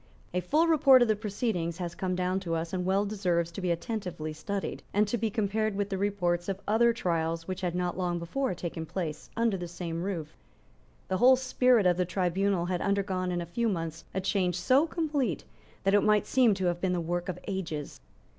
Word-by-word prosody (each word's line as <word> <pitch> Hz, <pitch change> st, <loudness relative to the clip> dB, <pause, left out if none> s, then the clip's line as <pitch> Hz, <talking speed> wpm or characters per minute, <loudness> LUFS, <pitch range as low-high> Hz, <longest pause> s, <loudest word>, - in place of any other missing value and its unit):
A 180 Hz, -, +1 dB
full 305 Hz, -, +2 dB
report 275 Hz, -6 st, +6 dB
of -, -, +1 dB
the 215 Hz, -, +3 dB
proceedings 200 Hz, -5 st, -2 dB
has 175 Hz, -2 st, -4 dB
come 185 Hz, +1 st, -2 dB
down 185 Hz, +1 st, 0 dB
to 170 Hz, -3 st, -2 dB
us, 165 Hz, +2 st, -3 dB
and 180 Hz, -1 st, -1 dB
well 195 Hz, +2 st, +2 dB
deserves 180 Hz, -5 st, 0 dB
to 195 Hz, -, -6 dB
be 180 Hz, -, -1 dB
attentively 170 Hz, -3 st, -3 dB
studied, 195 Hz, +6 st, -4 dB
and 210 Hz, +1 st, +4 dB
to 210 Hz, -, -1 dB
be 225 Hz, -1 st, 0 dB
compared 215 Hz, -1 st, 0 dB
with 205 Hz, 0 st, -1 dB
the 195 Hz, -, -2 dB
reports 180 Hz, -3 st, 0 dB
of 195 Hz, -1 st, -2 dB
other 230 Hz, +3 st, +4 dB
trials 165 Hz, -7 st, -1 dB
which 185 Hz, 0 st, -4 dB
had 180 Hz, -2 st, -1 dB
not 180 Hz, -1 st, -1 dB
long 175 Hz, -1 st, 0 dB
before 210 Hz, +8 st, -2 dB
taken 165 Hz, -2 st, -5 dB
place 165 Hz, -4 st, -4 dB
under 230 Hz, -4 st, +2 dB
the 175 Hz, -1 st, -5 dB
same 170 Hz, -1 st, -5 dB
roof. 170 Hz, -5 st, -4 dB, 0.7 s
The 185 Hz, -, 0 dB
whole 255 Hz, +5 st, +7 dB
spirit 250 Hz, -3 st, +3 dB
of 180 Hz, -1 st, +4 dB
the 180 Hz, -, +1 dB
tribunal 180 Hz, +1 st, 0 dB
had 180 Hz, -1 st, -1 dB
undergone 195 Hz, -2 st, 0 dB
in 175 Hz, -1 st, -1 dB
a -, -, -4 dB
few 230 Hz, +7 st, -1 dB
months 165 Hz, -4 st, -3 dB
a 190 Hz, -, -2 dB
change 185 Hz, -2 st, +1 dB
so 265 Hz, -, +3 dB
complete 290 Hz, -, -1 dB, 0.4 s
that 195 Hz, +1 st, +2 dB
it 205 Hz, -, +6 dB
might 210 Hz, -1 st, +3 dB
seem 245 Hz, -5 st, +4 dB
to 190 Hz, -1 st, -2 dB
have 175 Hz, 0 st, 0 dB
been 185 Hz, -1 st, +1 dB
the 180 Hz, -, 0 dB
work 175 Hz, +2 st, -2 dB
of 180 Hz, -, -3 dB
ages. 165 Hz, -7 st, -4 dB
185 Hz, 215 wpm, -29 LUFS, 175-210 Hz, 0.7 s, whole